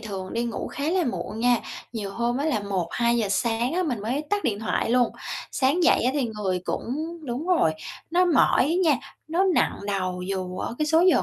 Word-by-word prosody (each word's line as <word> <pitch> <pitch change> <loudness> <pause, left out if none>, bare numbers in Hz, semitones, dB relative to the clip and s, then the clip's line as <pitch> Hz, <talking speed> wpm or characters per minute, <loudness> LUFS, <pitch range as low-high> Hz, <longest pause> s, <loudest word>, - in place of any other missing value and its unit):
thường 190 -3 -6
đi 235 +1 0
ngủ 235 -2 -3
khá 280 - -5
là 365 0 +2
muộn 210 - -3
nha, 245 +1 +4 0.4
nhiều 210 -4 -4
hôm 235 +2 0
á 285 - -1
là 275 -9 +1
1:00-2:00 205 +4 0
sáng 235 +3 0
á, 365 - +2
mình 255 - -2
mới 260 +8 -1
tắt 410 0 0
điện 205 -3 0
thoại 225 - 0
luôn, 245 -1 +3 0.4
sáng 285 +6 +2
dậy 335 - +5
á 250 - +3
thì 285 -3 +1
người 190 -3 -1
cũng 315 - -3
đúng 250 +6 -3
rồi, 345 - +3 0.4
nó 355 +2 +4
mỏi 335 -6 +4
á 310 +5 +1 0.2
nha, 275 - +3 0.3
nó 345 +4 +2
nặng - - +2
đầu 185 -3 -2
dù 185 -1 -3
ở - - -3
cái 305 - +1
số 320 +2 +4
giờ - - +3
240 Hz, 215 wpm, -25 LUFS, 205-305 Hz, 0.4 s, dậy